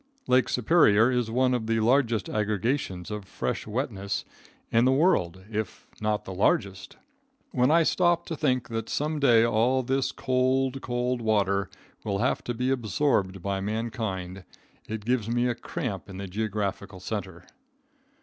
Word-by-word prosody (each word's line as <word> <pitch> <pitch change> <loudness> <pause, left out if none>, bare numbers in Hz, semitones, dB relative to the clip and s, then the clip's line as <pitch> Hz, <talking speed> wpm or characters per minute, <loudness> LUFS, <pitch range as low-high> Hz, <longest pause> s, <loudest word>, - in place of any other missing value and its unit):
Lake 125 0 +3
Superior 125 -4 +4
is 125 -3 0
one 125 +2 +2
of 115 -3 -1
the 115 0 +1
largest 115 -2 +2
aggregations 105 -2 -1
of 105 -1 -4
fresh 65 -3 -3
wetness 105 -4 -3 0.5
in 115 +1 +4
the 130 - +4
world, 95 - +2
if 110 -2 -4 0.2
not 105 0 -1
the 95 - -6
largest. 95 0 0 0.5
When 125 +2 +2
I 165 +2 +5
stop 175 +1 +2
to 165 - -4
think 130 -5 0
that 115 -1 -4
some 150 +1 -1
day 115 -5 +5
all 120 +3 +2
this 135 +2 0
cold, 130 +1 0
cold 125 0 -1
water 100 -3 +1 0.3
will 100 -2 -1
have 115 +6 0
to 120 - -3
be 125 +3 0
absorbed 110 - 0
by 100 -1 -1
mankind, 105 -4 -3 0.4
it 110 -1 -5
gives 120 -3 0
me 120 +1 +1
a 120 - +1
cramp 105 -4 -5
in 95 - -8
the 100 - -5
geographical 100 -1 -3
center. 95 -2 -5
115 Hz, 155 wpm, -27 LUFS, 100-125 Hz, 0.5 s, I